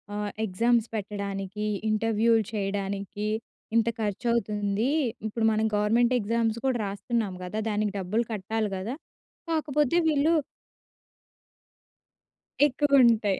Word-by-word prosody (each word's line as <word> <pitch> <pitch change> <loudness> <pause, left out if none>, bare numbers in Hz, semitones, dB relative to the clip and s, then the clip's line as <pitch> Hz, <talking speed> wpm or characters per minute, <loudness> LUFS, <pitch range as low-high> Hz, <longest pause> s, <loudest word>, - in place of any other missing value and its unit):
ఆహ్, 210 -1 -2
ఎగ్జామ్స్ 230 +3 +2
పెట్టడానికి, 200 -1 -4 0.2
ఇంటర్‌వ్యూలు 225 +1 +2
చేయడానికి, 200 0 -3 0.5
ఇంత 230 0 +3
ఖర్చవుతుంది. 210 0 0 0.4
ఇప్పుడు 220 +1 -1
మనం 220 0 +1
గవర్నమెంట్ 230 +4 +3
ఎగ్జామ్స్ 225 +1 0
కూడా 260 -2 +2
రాస్తున్నాం 200 +1 -2
కదా! 180 +4 -5
దానికి 210 -1 0
డబ్బులు 200 +5 0
కట్టాలి 215 +1 -2
కదా! 220 +8 -4 0.5
కాకపోతే 300 -1 +1
వీళ్ళు 305 +1 +3 2.3
ఎక్కువుంటాయి. 250 -8 +4
215 Hz, 95 wpm, -27 LUFS, 205-235 Hz, 2.3 s, ఎక్కువుంటాయి